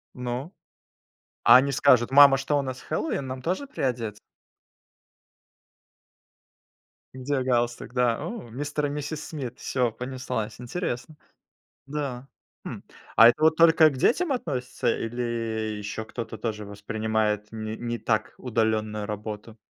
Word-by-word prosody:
Ну. 125 +6 -4 0.9
А 120 +2 +9
они 140 +2 +2
скажут: 130 -3 +4
"Мама, 140 -1 +8
что, 145 +2 0
у - - +2
нас 130 -1 -5
Хэллоуин, 140 - -2
нам 130 0 -5
тоже 185 - -2
приодетьс?" 115 - -2 3.0
Где 130 +1 -1
галстук, 120 -1 -1
да. 125 -2 +2
О! 190 - -6
Мистер 145 +4 -2
и - - -4
миссис 150 +1 -4
Смит, 130 -6 -6
всё 125 -3 0
понеслась, 125 -2 -4
интересно. 140 +2 -4 0.7
Да. 135 -3 -4 0.4
Хм. - - -6 0.3
А 115 - +9
это 150 +5 0
вот 160 0 +5
только 165 -1 +6
к 130 - -7
детям 305 - +2
относится, 125 - -2
или 115 -2 -3
еще 105 +1 -5
кто-то 115 -1 -6
тоже 105 -2 -3
воспринимает 105 +1 -2
не 110 0 -5
не 120 -1 -4
так 110 -1 0
удаленную 110 -3 0
работу? 105 +1 -6
125 Hz, 130 wpm, -26 LUFS, 110-140 Hz, 3.0 s, А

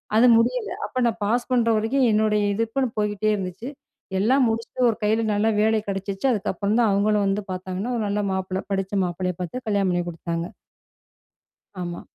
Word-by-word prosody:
அது 225 +3 +6
முடியல. 435 - +1 0.2
அப்ப 255 - -3
நான் 230 -1 0
பாஸ் 240 +5 0
பண்ற 240 -2 +3
வரைக்கும் 235 +5 +2
என்னுடைய 210 -1 +2
எதிர்ப்புன்னு 230 +5 -1
போய்கிட்டே 210 0 0
இருந்துச்சு. 190 +4 -5 0.5
எல்லாம் 255 +6 +3
முடிச்சுட்டு 230 +2 0
ஒரு 225 - -1
கையில 220 +2 +2
நல்ல 205 +2 +1
வேலை 220 +1 +3
கிடைச்சுச்சு. 195 +2 -3
அதுக்கப்புறம் 205 -1 -1
தான் 230 -3 +4
அவுங்களும் 205 +1 +2
வந்து 195 +1 0
பார்த்தாங்கன்னா, 185 +5 -4
ஒரு 225 - -1
நல்ல 205 +1 0
மாப்பிள்ளை 190 0 -2
படித்த 195 +1 -1
மாப்பிள்ளையா 180 0 -3
பார்த்து 245 +9 -5
கல்யாணம் 200 -3 +1
பண்ணி 175 0 0
கொடுத்தாங்க. 170 0 -4 1.4
ஆமா. 175 -1 -5
210 Hz, 165 wpm, -23 LUFS, 190-230 Hz, 1.4 s, அது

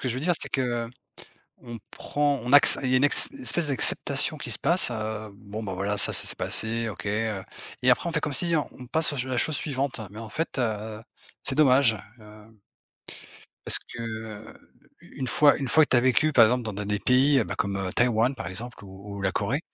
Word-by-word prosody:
que 130 - -3
je 120 - -2
veux 130 - -4
dire, 175 +4 +1
c'est - - -3
que, 120 -3 -2 0.7
on 120 -2 -9
prend 145 -2 -1
on 125 - -4
acce 145 - +7
il 130 - -1
y 130 - +2
a - - +6
une 130 - +3
ex 145 - +4
espèce 255 - -1
d'acceptation 135 -5 0
qui - - -6
se - - 0
passe, 175 -6 +3
heu, 110 -1 -5
bon 105 +2 -9
bah, 95 -3 -5
voilà, 100 +2 -2
ça - - +5
ça - - +3
s'est - - -2
passé, 115 +1 -1
OK. 105 - -8
Heu 105 -1 -2 0.4
et 125 - +4
après, 125 +7 +2
on - - -4
fait 150 - 0
comme 150 - -2
si 170 +4 +1
on 150 - -1
on 125 - -9
passe 160 +5 +3
aux - - -5
ch 130 0 -2
à - - -8
la 130 - -1
chose 150 +4 +1
suivante, 135 -3 -3
mais 105 - -11
en 115 - -9
fait, 160 +4 -3
heu, 110 -2 -3 0.4
c'est 135 - -2
dommage, 130 -5 +4 0.2
heu 105 +1 -17 1.1
parce - - +3
que, - - -12
heu, 110 -1 -9 0.3
u - - -16
une 130 - -3
fois 145 +2 +4
une 135 - -4
fois 155 +5 +5
que - - -17
tu - - +4
as - - +5
vécu, 130 +5 +2
par 120 -4 +7
exemple 125 +2 0
dans 110 - -4
de 100 +1 -5
des 105 0 -1
pays 130 +4 +3
ben, - - -5
comme 100 0 -2 0.2
Taïwan, 120 +1 +2
par 125 - -7
exemple, 115 +4 -7
ou 100 +1 -11
ou - - -7
la 95 -1 0
Corée 115 +10 -1
120 Hz, 240 wpm, -25 LUFS, 110-140 Hz, 1.1 s, acce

